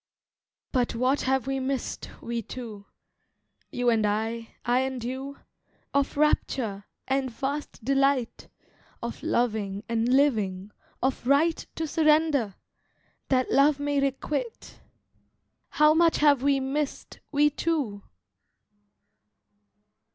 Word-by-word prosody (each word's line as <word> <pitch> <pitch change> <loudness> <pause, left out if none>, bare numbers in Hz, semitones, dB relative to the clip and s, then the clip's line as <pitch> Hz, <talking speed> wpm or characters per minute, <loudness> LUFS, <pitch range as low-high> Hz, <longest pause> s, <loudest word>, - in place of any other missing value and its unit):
But 245 -3 0
what 255 +4 +1
have 265 -2 +1
we 270 0 -1
missed, 265 -1 -3
we 235 0 -2
two— 220 -3 -8 0.8
You 245 -1 +1
and 225 -2 +2
I—I 225 +3 -1
and 260 -2 -2
you— 265 +3 -5 0.6
Of 280 0 0
rapture, 235 -9 0 0.2
and 265 0 0
vast 270 0 -5
delight, 275 -2 +1 0.6
Of 235 - -5
loving, 210 -4 -1
and 230 +1 0
living, 210 -8 +2 0.3
of 260 -2 -1
right 310 +4 +3
To 320 - -2
surrender, 305 - +2 0.7
that 255 -1 +1
love 280 +1 +4
may 285 0 0
requite, 285 - -3 0.9
How 300 0 +5
much 330 0 +4
have 290 -3 +4
we 275 0 +3
missed, 275 +2 -3
we 295 0 +4
two! 285 -10 -1
265 Hz, 105 wpm, -27 LUFS, 235-285 Hz, 0.9 s, How